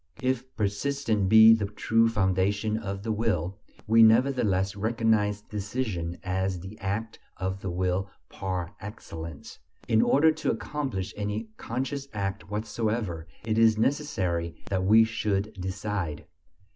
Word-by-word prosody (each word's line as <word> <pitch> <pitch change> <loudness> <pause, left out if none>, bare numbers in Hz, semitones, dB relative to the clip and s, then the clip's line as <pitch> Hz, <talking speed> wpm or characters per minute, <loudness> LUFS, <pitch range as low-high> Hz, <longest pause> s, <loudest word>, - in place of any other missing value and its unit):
If 130 0 -1
persistence 110 -1 0
be 110 +1 +9
the 105 -3 +1
true 115 +2 +2
foundation 100 +1 +1
of 100 -3 -4
the 110 - -1
will, 105 -5 -1 0.3
we 115 +1 +5
nevertheless 110 -5 +4
recognize 110 -1 +1
decision 100 -5 -3
as 95 0 -1
the 95 +4 -9
act 105 +2 -3 0.2
of 95 0 -3
the 95 - -3
will 90 +2 -1 0.2
par 90 -1 -4
excellence. 85 -7 -8 0.3
In 110 -1 +4
order 160 +3 +5
to 155 0 -2
accomplish 130 -11 -3
any 105 +2 -3
conscious 135 +3 -3
act 100 -1 -3
whatever, 105 -5 -2 0.2
it 110 0 0
is 110 -1 +5
necessary 95 - 0 0.2
that 95 -1 +1
we 110 +3 +7
should 105 -2 -1
decide. 95 -4 -4
105 Hz, 130 wpm, -27 LUFS, 95-115 Hz, 0.3 s, be